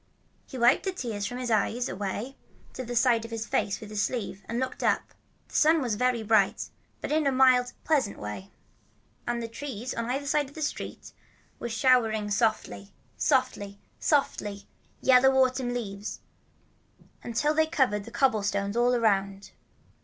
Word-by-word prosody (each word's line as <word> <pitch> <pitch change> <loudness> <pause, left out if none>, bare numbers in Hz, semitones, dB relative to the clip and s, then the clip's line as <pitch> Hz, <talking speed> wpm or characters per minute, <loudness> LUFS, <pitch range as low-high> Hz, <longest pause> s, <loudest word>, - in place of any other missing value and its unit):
He 265 - -8
wiped 245 +8 +4
the 380 - 0
tears 225 - -4
from 245 - -5
his 250 -2 -3
eyes 225 +3 +1
away 205 +7 -4 0.4
to 260 - -5
the 245 0 -5
side 240 -2 +3
of 230 - -7
his 225 -1 -4
face 200 - -1
with 215 -1 -10
his 210 -1 -1
sleeve, 205 -4 -3
and 230 - -2
looked 260 0 -3
about. - - +2 0.5
The - - -20
sun 320 +2 +4
was 245 -6 -1
very 245 +1 +1
bright, 210 -3 +2 0.3
but - - -4
in 305 -1 +2
a - - +3
mild, 255 -1 +4
pleasant 280 -10 +1
way. 105 -2 -7 0.8
And 240 -1 -1
a - - -3
tree 245 -1 -7
on 230 - -3
the 250 - 0
other 280 +1 -4
side 290 -1 +1
of 285 - -19
the 315 - -4
street 290 - -5 0.5
was 235 - -4
showering 225 -4 +2
softly, 200 - -1 0.2
softly, 200 0 0 0.2
softly, 205 -9 0 0.3
yellow 265 +1 +5
autumn 255 -1 +2
leaves, 205 -4 -5 1.0
until 245 +6 0
they 315 0 +3
covered 225 -10 +1
the - - -9
cobblestones 205 -5 0
all 245 +1 +3
around. 200 -4 0
235 Hz, 170 wpm, -27 LUFS, 205-260 Hz, 1.0 s, yellow